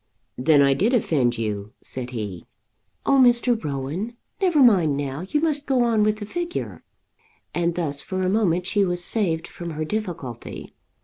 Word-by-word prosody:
"Then 140 +2 +5
I 140 0 +4
did 215 - +2
offend 135 - +1
you?" 105 -2 -3
said 125 -1 -4
he. 105 -8 -6 0.6
"Oh, 275 -1 +4
Mr. 240 -1 +3
Rowan, 150 - -4 0.2
never 360 -5 +2
mind 175 - +4
now; 145 +5 -4
you 300 - +1
must 300 -3 0
go 260 -3 +3
on 230 -2 +2
with 210 0 +2
the 210 - -6
figure," 345 +9 -4 0.7
and 170 -1 0
thus 145 -5 -1
for 185 0 -3
a - - +1
moment 185 -3 +1
she 200 +1 +2
was 175 -2 -1
saved 170 -7 -1
from 170 -1 -7
her 155 -1 -3
difficulty. 165 - -5
175 Hz, 170 wpm, -23 LUFS, 140-225 Hz, 0.7 s, Then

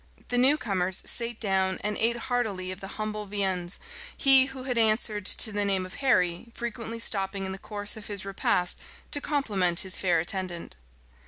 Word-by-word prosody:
The 245 - 0
new 270 +4 +5
comers 190 -7 -1
sate 235 -1 +1
down, 190 -3 +1
and 210 0 -1
ate 230 +1 +1
heartily 225 -7 -2
of 185 - -8
the 195 0 -8
humble 215 -1 -4
viands, 190 -3 -2 0.4
he 270 -2 +7
who 265 -1 -8
had 255 -1 -2
answered 215 -2 +1
to 220 - +4
the 205 0 0
name 195 -2 0
of 185 - -10
Harry 185 -6 +1
frequently 230 -1 -5
stopping 195 -3 0
in 190 - -4
the 190 - -6
course 210 -1 -3
of 215 -1 -9
his 200 -2 -6
repast 180 -2 +1 0.3
to 290 - +2
compliment 200 - +2
his 190 -1 -2
fair 180 -3 +2
attendant. 175 - -4
205 Hz, 180 wpm, -27 LUFS, 190-235 Hz, 0.4 s, he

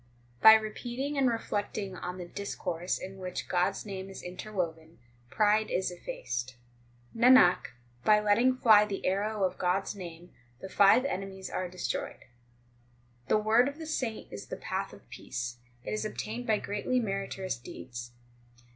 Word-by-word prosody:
6 - - -32
By 220 - +11
repeating 240 +6 -3
and 270 -2 +3
reflecting 205 -3 -3
on 180 0 -5
the 180 - -6
discourse 180 -2 -3
in 190 +1 -8
which 180 -1 -5
God 180 0 +2
s 195 - -5
name 195 -2 -6
is 195 - -9
interwoven, 175 -4 -5 0.3
pride 215 - +3
is 185 0 0
effaced. 120 -7 -5 0.6
Nanak, 240 -6 +6 0.4
by 210 0 +6
letting 230 +5 +3
fly 215 -4 +7
the 200 -2 -4
arrow 205 +2 0
of 185 - 0
God 180 +2 +2
s - - -5
name 175 -3 -9 0.3
the 190 - -8
five 200 +7 +5
enemies 190 -5 -4
are 185 -1 -2
destroyed. 180 +1 -4 1.0
The - - +4
word 220 +4 +4
of 285 +1 -5
the 320 - -7
saint 255 -8 -3
is 100 - -7
the - - -5
path - - -3
of - - -15
peace; 120 0 -5 0.3
it - - -5
is 215 - -1
obtained 220 +3 -4
by 215 -1 +3
greatly 210 +6 -1
meritorious 195 -3 -3
deeds. 120 0 -8
195 Hz, 160 wpm, -30 LUFS, 180-220 Hz, 1.0 s, By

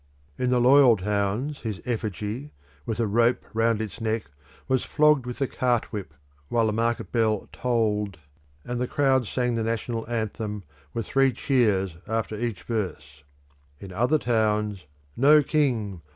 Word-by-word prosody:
In 125 - -1
the 125 -1 +3
loyal 125 -1 +6
towns 105 +8 -1
his 110 -4 -4
effigy, 110 +3 -4 0.3
with 115 0 -2
a 115 - +2
rope 115 +3 +2
round 115 0 +2
its 110 -1 -5
neck, 110 -8 -2 0.4
was 130 -1 +1
flogged 150 -4 +3
with 125 - -6
a - - +4
cart 125 -2 -1
whip, 95 -7 -6 0.3
while 115 -1 +2
the 110 - 0
market 115 +1 -1
bell 110 -3 +1
tolled, 105 -6 0 0.5
and 125 0 -3
the 125 - 0
crowd 130 -4 +2
sang 125 +1 0
the 115 - -1
national 115 0 -3
anthem, 110 -2 -3 0.3
with 115 +5 -3
three 135 -1 +3
cheers 105 - +1
after 110 0 -2
each 115 -2 -3
verse. 90 - -4 0.6
In 95 - -9
other 120 +10 +2
towns, 105 - 0 0.3
"No 150 +3 +6
King! 120 - 0
115 Hz, 150 wpm, -25 LUFS, 105-125 Hz, 0.6 s, loyal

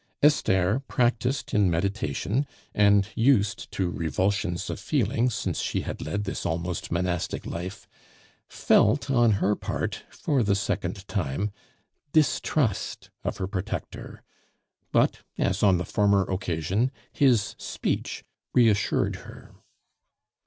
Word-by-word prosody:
Esther, 105 -7 +3
practised 125 +1 0
in 100 -3 +4
meditation, 100 - -1 0.3
and 100 -1 +4
used 115 -4 +2
to 90 -2 -1
revulsions 90 +3 -1
of - - -4
feeling 120 -3 +1
since 120 - -2
she - - -1
had - - -6
led 100 +7 -2
this 95 - -4
almost 85 +1 -3
monastic 90 0 -1
life, 90 +4 -6 0.6
felt 135 +6 +3
on 120 -4 +4
her 100 +1 +2
part, - - -3
for 140 -4 0
the 100 -3 +2
second 100 0 -2
time, 95 +10 -2 0.6
distrust 150 - +1
of - - -2
her 95 - -2
protector; 100 +3 -5 0.7
but, - - +3 0.2
as - - 0
on 95 -3 +5
the 90 - -3
former 100 -2 +3
occasion, 95 +5 -1 0.2
his 125 -8 +3
speech - - -3 0.3
reassured 110 -5 +3
her. - - -13
100 Hz, 115 wpm, -26 LUFS, 90-120 Hz, 0.7 s, on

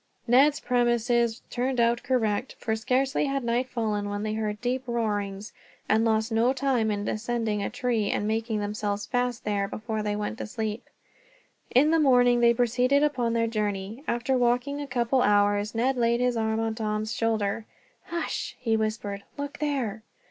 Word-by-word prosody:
Ned's 275 +5 +4
premises 240 -1 +1
turned 255 +1 -1
out 235 0 +3
correct, 250 -2 0
for 220 - -1
scarcely 260 +6 +1
had 275 -1 -1
night 240 +2 0
fallen 210 -4 -2
when 205 0 -3
they 215 0 -2
heard 210 -1 -2
deep 250 +2 -1
roarings, 205 -4 -2 0.3
and 220 +1 +3
lost 220 0 +1
no 230 +3 +3
time 265 -5 +1
in 205 -1 -2
ascending 225 -2 -1
a - - -2
tree, 235 -3 -1
and 205 - -1
making 220 0 -1
themselves 205 0 -2
fast 245 0 -1
there, 200 -1 0
before 220 +1 -4
they 210 0 -1
went 210 +2 -4
to - - -4
sleep. 220 0 -4 0.8
In 290 +5 +4
the 325 - +4
morning 245 -4 +5
they 235 0 +6
proceeded 250 +4 +2
upon 250 -6 +1
their 230 0 +2
journey. 210 +1 -3
After 240 +3 0
walking 250 +4 +1
a 285 - -5
couple 250 0 +1
of - - +3
hours, 205 +1 +2
Ned 255 +3 +1
laid 235 0 +2
his 250 -1 +1
arm 220 -1 0
upon 225 0 -1
Tom's 215 0 -2
shoulder. 220 -1 -1 0.4
"Hush!" 340 -1 -3
he 230 -3 +1
whispered. 215 -2 -2 0.2
"Look 285 +1 -5
there." 265 -8 -2
230 Hz, 175 wpm, -27 LUFS, 215-250 Hz, 0.8 s, they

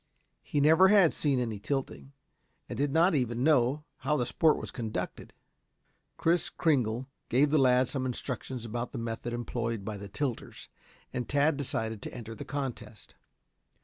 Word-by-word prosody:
He 145 - -2
never 160 +6 +6
had 195 -5 +6
seen 140 -3 +1
any 115 -4 -2
tilting, 135 +3 -4 0.5
and - - -5
did 140 0 0
not 170 +5 +4
even 125 -4 0
know 145 -1 +3
how 150 - 0
the 125 - 0
sport 160 +5 +3
was - - -6
conducted. 115 -4 -5 0.9
Kris 170 0 +2
Kringle 125 -6 +1 0.2
gave 140 +4 +3
the 155 - +4
lad 130 -1 +4
some 130 -1 -2
instructions 125 -1 -4
about 120 +2 -4
the - - -4
method 115 +1 -4
employed 115 -3 -3
by 105 -1 -4
the 100 0 -8
tilters, 130 +2 -4 0.4
and 125 -1 -3
Tad 145 +2 +3
decided 110 -6 -3
to - - -6
enter 115 -2 -7
the 110 - -7
contest. 135 -6 -6
130 Hz, 160 wpm, -30 LUFS, 115-145 Hz, 0.9 s, never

